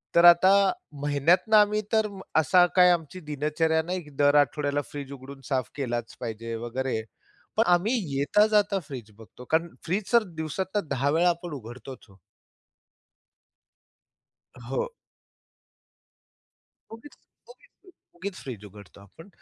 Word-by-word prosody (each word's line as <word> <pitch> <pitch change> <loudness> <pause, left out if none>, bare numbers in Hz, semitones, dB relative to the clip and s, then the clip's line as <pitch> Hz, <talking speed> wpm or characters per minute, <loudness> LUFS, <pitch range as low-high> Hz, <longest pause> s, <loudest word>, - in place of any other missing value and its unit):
तर 170 - +6
आता 175 +2 +7 0.5
महिन्यातनं 150 +9 +2
आम्ही 210 0 +4
तर 220 -1 +3 0.3
असा 175 +3 +5
काय 180 -1 +7
आमची 170 +1 -2
दिनचर्या 155 +2 0
नाही, 180 +2 -3
की 150 - -15
दर 145 +1 +2
आठवड्याला 145 0 +2
फ्रीज 140 -2 -7
उघडून 135 0 -11
साफ 130 -4 -1
केलाच 120 -4 -4
पाहिजे 115 -1 -5
वगैरे, 125 -1 -2 0.6
पण - - +5
आम्ही 195 +8 +2 0.2
येता 175 +10 +3
जाता 205 -2 +2
फ्रीज 120 -6 -8
बघतो 115 +2 -14
कारण 165 +2 +2 0.2
फ्रीज 190 +4 -2
तर 235 -1 +6 0.2
दिवसातनं 190 +4 -3
10 140 +1 0
वेळा 170 +3 +3
आपण 170 -1 -4
उघडतोच 130 +1 -10
हो. 95 - -20 2.5
हो. 135 - -2 2.0
उगीच 230 +6 -12 0.4
उगी - - -17 0.5
उगीच 185 +3 -6
फ्रीज 115 -6 -8
उघडतो 100 -1 -14
आपण. 100 - -16
150 Hz, 125 wpm, -26 LUFS, 130-180 Hz, 2.5 s, आता